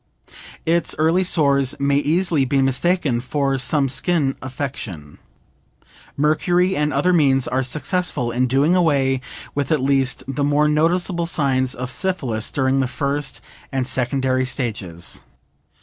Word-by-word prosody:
Its 170 +1 +1
early 165 +4 +2
sores 140 -6 +2
may 140 0 +2
easily 160 +1 +2
be 135 +1 +1
mistaken 135 -1 +1
for 135 +1 -1
some 135 +2 +2
skin 140 0 0
affection. 125 - -6 1.0
Mercury 175 +5 +2
and 150 0 0
other 145 +7 +2
means 135 -6 +3
are 130 - 0
successful 145 -1 -1
in 125 +2 +1
doing 140 +7 +2
away 140 -7 +2 0.3
with 140 0 -2
at 155 - +3
least 135 -1 +1
the 135 +1 -2
more 145 +1 +2
noticeable 170 +3 +1
signs 130 -5 +1
of 125 0 -5
syphilis 130 - -2
during 135 0 +1
the 130 - +1
first 140 +1 -3 0.3
and 135 -2 -1
secondary 130 0 0
stages. 110 - -4
140 Hz, 135 wpm, -20 LUFS, 130-155 Hz, 1.0 s, means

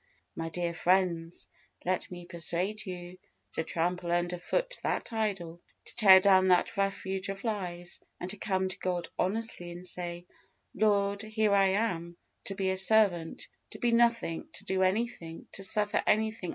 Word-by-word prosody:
My 165 0 -3
dear 170 +1 -2
friends, 175 -1 +1 0.4
let 185 +1 -1
me 175 -1 -8
persuade 175 +5 -2
you 180 0 -7 0.3
to 160 - -1
trample 175 +2 -1
under 175 0 0
foot - - -1
that - - -2
idol, 190 -6 -2 0.2
to - - -11
tear 195 -5 +9
down 190 -1 +5
that 185 +5 +3
refuge 195 -1 -2
of 195 0 -5
lies, 180 -6 -4 0.2
and 180 - -4
to 210 - -4
come 190 -2 0
to 185 - -5
God 180 -2 -2
honestly, 195 -2 -1
and 175 +1 -8
say, 175 -1 -5 0.5
"Lord, 200 -2 +2
here 215 -1 +1
I 195 -1 +5
am, 175 -4 -1 0.3
to 195 - -3
be 190 -1 0
a 190 - -1
servant, 190 -5 +2 0.2
to - - -8
be 240 - +1
nothing, 235 -7 +2
to - - -7
do 190 0 0
anything, 185 -4 -1
to - - -7
suffer 210 +2 +1
anything. 215 -3 +1
190 Hz, 165 wpm, -30 LUFS, 175-210 Hz, 0.5 s, tear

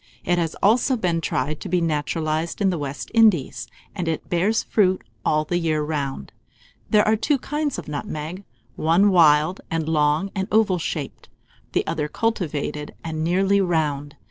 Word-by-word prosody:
It 175 0 +1
has 165 -2 -1
also 245 +5 +3
been 175 -6 0
tried 150 0 -2
to 195 - -7
be 180 0 +2
naturalized 155 0 -1
in 195 -2 +2
the 175 - -3
West 140 -1 -5
Indies, 215 - +3 0.3
and 180 -4 -4
it 160 -1 -3
bears 190 +6 +2
fruit 190 -3 +2 0.2
all 155 0 +1
the 175 +3 0
year 155 -3 0
round. 140 - -4 0.6
There 210 -1 +4
are 215 - +4
two 280 +6 +1
kinds 295 +2 -2
of - - -7
nutmeg, 155 +5 -5 0.3
one 175 +6 +3
wild, 160 0 +4
and 165 -1 -2
long 155 +4 +1
and 190 -1 -2
oval 210 -4 +3
shaped, 150 -3 -5 0.4
the - - +1
other 155 -2 -2
cultivated, 150 -7 -2
and 160 -1 -3
nearly 195 +4 +2
round. 150 -5 -1
165 Hz, 165 wpm, -23 LUFS, 150-195 Hz, 0.6 s, There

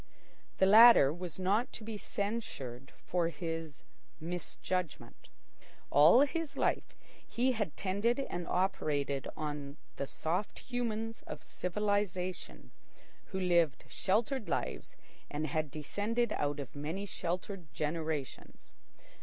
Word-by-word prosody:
The 190 - +5
latter 215 - +9
was 175 -1 -6
not 205 +7 +1
to 225 - -6
be 220 0 -5
censured 200 - -4
for 175 -2 +1
his 165 -3 -5 0.4
misjudgment. 175 -4 -4 0.6
All 160 - +8
his 315 +2 -1
life - - 0 0.3
he 255 +2 +1
had 210 - -2
tended 205 +6 +1
and 175 -10 -3
operated 145 -7 0
on 145 -1 -4 0.2
the 140 - -2
soft 180 +9 -2
humans 225 -2 -3
of - - -7
civilisation, 185 -1 -2 0.5
who 190 - -4
lived 170 -6 +2
sheltered 220 +4 0
lives - - -3 0.3
and 150 +1 -2
had 155 0 -1
descended 210 - -1
out 145 0 -1
of 140 -1 -7
many 160 +8 -3
sheltered 180 -2 -4
generations. 155 -3 -4
180 Hz, 110 wpm, -33 LUFS, 155-210 Hz, 0.6 s, latter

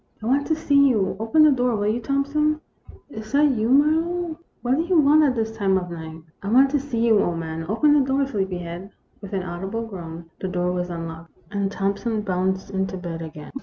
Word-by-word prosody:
" - - -38
I - - -4
want 275 +4 +1
to 315 - +2
see 280 -2 +4
you. 205 -7 +1
Open 225 +8 +4
the 305 - +7
door, 250 -3 +1
will 205 -1 -1
you, 215 +3 +1
Thompson? 285 +4 0 0.2
" - - -20
" - - -23
Is 220 -3 -8
that 290 0 +5
you, 225 -2 0
Marlowe? 320 +4 +2 0.2
What 255 +2 +2
do - - +2
you 345 +1 +1
want 300 +1 +5
at 270 -4 +2
this 225 -1 -2
time 195 -3 +2
of 180 -1 -4
night? 160 -1 -8
" 155 - -31
" - - -43
I 195 - -6
want 265 +4 +5
to 290 - +2
see 245 -4 -1
you, 220 -3 +5
old 170 -1 -1
man. 160 0 -5
Open 290 +8 +3
the 295 - +5
door, 270 +1 +1
sleepyhead." 185 -6 -4 0.3
With 200 -1 -9
an 190 -2 -1
audible 195 +6 -4
groan, 170 -5 -9
the 190 - -3
door 180 -1 -1
was 180 0 -2
unlocked, 165 -1 -7
and 200 -1 -1
Thompson 200 +3 -1
bounced 190 -1 -1
into 190 -1 -2
bed 170 -2 -6
again. 155 -2 -9
215 Hz, 240 wpm, -23 LUFS, 180-275 Hz, 0.3 s, the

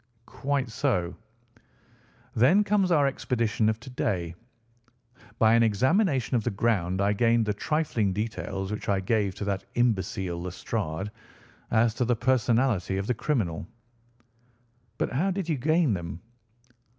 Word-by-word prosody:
"Quite 140 -2 -2
so." 110 - 0 1.2
"Then 140 - +5
comes 200 -3 +2
our 150 -4 +4
expedition 115 -5 0
of 110 0 -2
to 125 - -10
day. 90 -8 -2 1.0
By 110 0 +5
an 115 - +5
examination 130 - +2
of 115 - +1
the 120 - 0
ground 100 -4 0
I 100 +1 +2
gained 115 +1 +3
the 105 - 0
trifling 120 -4 0
details 95 -2 -3
which 105 - -4
I 100 -1 +2
gave 100 0 0
to 100 - -5
that 100 -1 -2
imbecile 95 -7 0
Lestrade, 90 +1 -4 0.6
as 110 0 +3
to 125 - -1
the 120 +1 +2
personality 115 -5 +1
of 100 - -2
the 125 - +1
criminal." 105 - -2 1.3
"But - - -1
how 165 +10 +1
did 190 -2 -2
you 160 -4 0
gain 155 -1 +2
them?" 85 -2 -5
110 Hz, 140 wpm, -27 LUFS, 95-130 Hz, 1.3 s, Then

